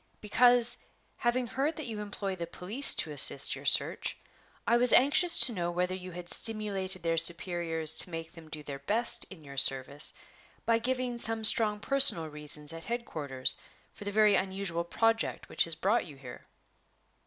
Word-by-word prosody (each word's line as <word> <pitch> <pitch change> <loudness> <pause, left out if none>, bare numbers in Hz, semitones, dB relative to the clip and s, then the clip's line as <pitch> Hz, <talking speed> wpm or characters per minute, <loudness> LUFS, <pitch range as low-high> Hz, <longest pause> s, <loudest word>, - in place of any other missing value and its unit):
"Because, 245 +2 +2 0.4
having 240 +1 -1
heard 275 +7 -3
that 310 - -7
you 225 -3 -6
employ 205 -2 -5
the 170 -2 -7
police 205 +11 0
to 155 - -2
assist 140 -1 +2
your - - -12
search, - - +2 0.5
I 235 - +2
was 245 0 +2
anxious 290 +7 +4
to 245 - +5
know 175 -4 -3
whether 180 +1 -2
you 185 0 -9
had 175 0 -10
stimulated 200 -4 0
their 165 0 -1
superiors 165 -1 -1
to - - +4
make 165 -1 -7
them 165 -2 -15
do 155 -1 -9
their 140 -1 -8
best 220 +12 0
in 180 -5 -13
your 140 -1 -12
service 135 +2 +2 0.5
by 230 0 +2
giving 250 0 -3
some 225 -1 +1
strong 215 -1 +5
personal 270 - +4
reasons 150 0 -2
at 165 0 -10
headquarters 150 - -3 0.4
for 205 - -12
the - - -3
very 210 0 +3
unusual 190 -3 -2
project 225 +6 -1
which - - 0
has 165 -1 -5
brought 195 +6 -1
you 150 - -12
here." 125 -3 -12
190 Hz, 175 wpm, -29 LUFS, 165-230 Hz, 0.5 s, to